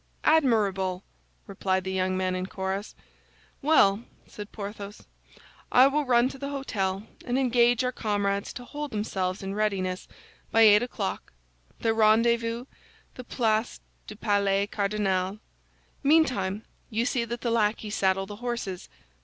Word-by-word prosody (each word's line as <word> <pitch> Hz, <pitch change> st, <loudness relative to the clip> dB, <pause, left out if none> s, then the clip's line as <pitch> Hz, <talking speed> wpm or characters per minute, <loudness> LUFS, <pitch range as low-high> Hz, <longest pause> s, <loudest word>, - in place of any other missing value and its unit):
"Admirable!" 205 Hz, -11 st, +2 dB, 0.4 s
replied 190 Hz, -1 st, -1 dB
the 190 Hz, -, -4 dB
young 185 Hz, 0 st, 0 dB
men 185 Hz, 0 st, 0 dB
in 185 Hz, 0 st, -3 dB
chorus. 190 Hz, +2 st, -4 dB, 0.7 s
"Well," 230 Hz, -8 st, +4 dB, 0.2 s
said 205 Hz, 0 st, -10 dB
Porthos, 205 Hz, 0 st, -8 dB, 0.7 s
"I 255 Hz, -, +7 dB
will 290 Hz, +2 st, +2 dB
run 240 Hz, 0 st, +4 dB
to 270 Hz, -, -10 dB
the 280 Hz, -, -4 dB
hôtel, 205 Hz, -8 st, -2 dB, 0.2 s
and 245 Hz, +1 st, -1 dB
engage 245 Hz, -1 st, +3 dB
our 250 Hz, -, 0 dB
comrades 205 Hz, -4 st, -1 dB
to 245 Hz, -, -8 dB
hold 295 Hz, +3 st, -5 dB
themselves 195 Hz, -4 st, -2 dB
in 195 Hz, 0 st, -4 dB
readiness 195 Hz, -3 st, -1 dB, 0.4 s
by 225 Hz, -, +3 dB
eight 210 Hz, -1 st, +7 dB
o'clock; 230 Hz, -5 st, -4 dB, 0.5 s
the 225 Hz, -1 st, +2 dB
rendezvous, 230 Hz, +2 st, +2 dB, 0.5 s
the 250 Hz, -, -9 dB
Place 225 Hz, -2 st, 0 dB, 0.3 s
du 215 Hz, -, -8 dB
Palais 200 Hz, -2 st, +1 dB
Cardinal. 200 Hz, -2 st, -1 dB, 0.6 s
Meantime, 255 Hz, -10 st, +2 dB, 0.2 s
you 230 Hz, 0 st, 0 dB
see 250 Hz, -1 st, 0 dB
that 235 Hz, +1 st, -5 dB
the 235 Hz, -, -1 dB
lackeys 215 Hz, -1 st, 0 dB
saddle 195 Hz, -1 st, +1 dB
the 205 Hz, +1 st, -9 dB
horses." 235 Hz, -6 st, -4 dB
210 Hz, 135 wpm, -27 LUFS, 195-240 Hz, 0.7 s, I